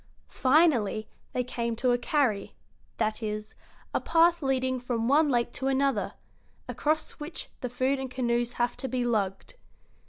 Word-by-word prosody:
Finally 255 - +3 0.2
they 250 - 0
came 235 -1 -2
to 250 +2 +1
a 245 - +3
"carry" 245 -6 0 0.4
that 220 0 0
is, 215 -1 -4 0.4
a - - +1
path 335 +1 +4
leading 260 -2 0
from 240 -2 -2
one 295 +3 +4
lake 240 -2 +1
to 265 - -3
another, 270 0 +1 0.5
across 310 +1 0
which 305 +3 -7
the 250 - -3
food 260 +3 0
and 265 -1 -4
canoes 240 -1 0
have 240 0 0
to 265 - -4
be 250 0 -1
lugged. 200 - -1
250 Hz, 155 wpm, -28 LUFS, 235-275 Hz, 0.5 s, path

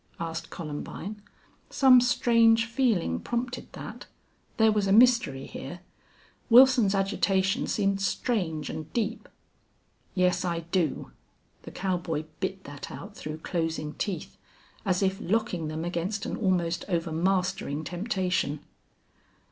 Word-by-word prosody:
asked 165 0 -4
Columbine. 170 +6 -6 0.5
Some 255 -2 +6
strange 230 -2 +4
feeling 230 - +1
prompted 245 +1 -4
that. - - -8 0.5
There 220 -1 +5
was 210 -2 +1
a - - +1
mystery 235 - +4
here. 175 +6 -8 0.7
Wilson's 245 -4 +7
agitation 195 -1 +1
seemed 195 -1 0
strange 185 - -1
and 155 0 -7
deep. 230 -1 -2 0.9
"Yes, 180 -1 +2
I 170 -2 -1
do." 170 -2 -1 0.5
The - - -10
cowboy 175 -5 -2 0.2
bit 190 0 -3
that 145 -1 -8
out 205 +1 -9
through 155 -3 -7
closing 160 -3 -2
teeth, 195 +3 -4 0.5
as 185 0 +1
if 190 0 0
locking 190 -5 -1
them 155 +2 -4
against 175 +4 -2
an - - -3
almost 180 -4 0
overmastering 170 -2 0
temptation. 180 -4 -1
190 Hz, 115 wpm, -27 LUFS, 165-215 Hz, 0.9 s, Wilson's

